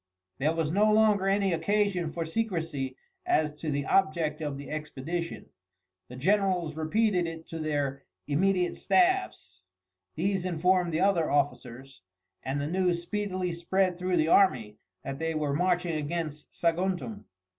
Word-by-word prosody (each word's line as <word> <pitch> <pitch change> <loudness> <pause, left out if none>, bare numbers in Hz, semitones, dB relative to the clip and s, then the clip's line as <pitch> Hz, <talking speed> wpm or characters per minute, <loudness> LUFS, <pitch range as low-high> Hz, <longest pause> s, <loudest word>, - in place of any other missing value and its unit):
There 155 +4 +1
was 160 -2 0
no 210 +4 +4
longer 210 -3 +4
any 195 -1 +2
occasion 180 -1 0
for 165 0 -3
secrecy 165 -9 -2 0.3
as 155 - +2
to 160 - -3
the 140 -1 -1
object 155 -4 +1
of 145 -3 -3
the 140 0 -8
expedition. 155 +3 -5 0.6
The 125 - -10
generals 180 +1 +1
repeated 180 +3 +1
it 165 0 -7
to 165 - -5
their 145 -3 -1 0.2
immediate 180 - +1
staffs, 365 - +1 0.5
these 195 -1 0
informed 180 0 +1
the 160 +2 0
other 190 -5 +2
officers, 135 -4 -2 0.4
and 135 +2 -2
the 140 - -2
news 180 +1 +1
speedily 185 -1 -2
spread 180 +2 0
through 180 0 -1
the 155 -1 +2
army 130 - +3 0.2
that 135 0 -5
they 165 0 -2
were 150 -2 -1
marching 175 +1 +1
against 155 0 -4
Saguntum. 165 - -1
165 Hz, 145 wpm, -28 LUFS, 150-185 Hz, 0.6 s, no